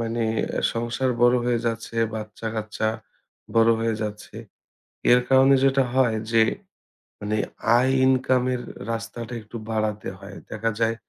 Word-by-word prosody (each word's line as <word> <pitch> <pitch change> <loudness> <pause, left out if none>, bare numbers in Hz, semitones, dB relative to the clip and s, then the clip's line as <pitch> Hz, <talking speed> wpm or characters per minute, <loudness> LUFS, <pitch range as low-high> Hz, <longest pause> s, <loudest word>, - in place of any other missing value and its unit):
মানে 115 0 -2 0.5
সংসার 120 +3 -1
বড় 120 0 +6
হয়ে 120 -1 +1
যাচ্ছে, 115 0 -3 0.2
বাচ্চা-কাচ্চা 110 0 -3 0.7
বড় 115 0 +5
হয়ে 115 0 0
যাচ্ছে। 105 -1 -6 0.8
এর 125 - +6
কারণে 135 +1 +6
যেটা 135 0 +4
হয়, 125 -4 +3 0.2
যে 115 -1 +5 0.8
মানে 105 +1 -2 0.4
আয় 130 +2 +3
ইনকামের 130 -1 +2 0.3
রাস্তাটা 115 +1 -5
একটু 105 +2 -9
বাড়াতে 110 -2 -2
হয়। 100 +1 -11 0.2
দেখা 110 +1 -1
যায় 115 0 +1
115 Hz, 125 wpm, -24 LUFS, 110-125 Hz, 0.8 s, বড়